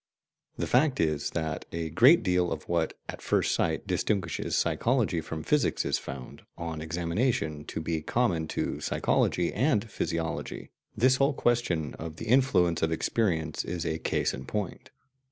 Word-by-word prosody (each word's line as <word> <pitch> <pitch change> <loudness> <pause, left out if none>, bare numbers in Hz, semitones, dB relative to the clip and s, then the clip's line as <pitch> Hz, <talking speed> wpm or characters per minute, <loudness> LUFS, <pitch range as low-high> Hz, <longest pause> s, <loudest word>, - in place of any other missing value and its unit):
The - - -1
fact 135 +2 +3
is 75 -2 +1
that 80 -2 -3
a 80 -1 -3
great 125 - +6
deal 90 -2 +2
of - - -5
what, 85 -2 0
at - - -7
first - - +1
sight, - - 0
distinguishes 95 -6 -1
psychology 115 -9 +1
from 80 0 -6
physics 150 -2 +1
is - - +1
found, 65 -2 -8 0.2
on 85 -2 -4
examination, 85 - -1
to - - -5
be 80 0 -2
common 85 -5 0
to - - -2
psychology 85 -1 +1
and 120 -2 +1
physiology; 85 -1 -3 0.3
this 130 +4 +4
whole 140 +2 +3
question 90 - 0
of 80 0 -6
the 115 - -7
influence 110 -9 +3
of 80 - +1
experience 80 -2 0
is 90 -3 -4
a 80 +1 -1
case - - 0
in 65 - -7
point. 105 -4 -4
85 Hz, 155 wpm, -28 LUFS, 80-115 Hz, 0.3 s, great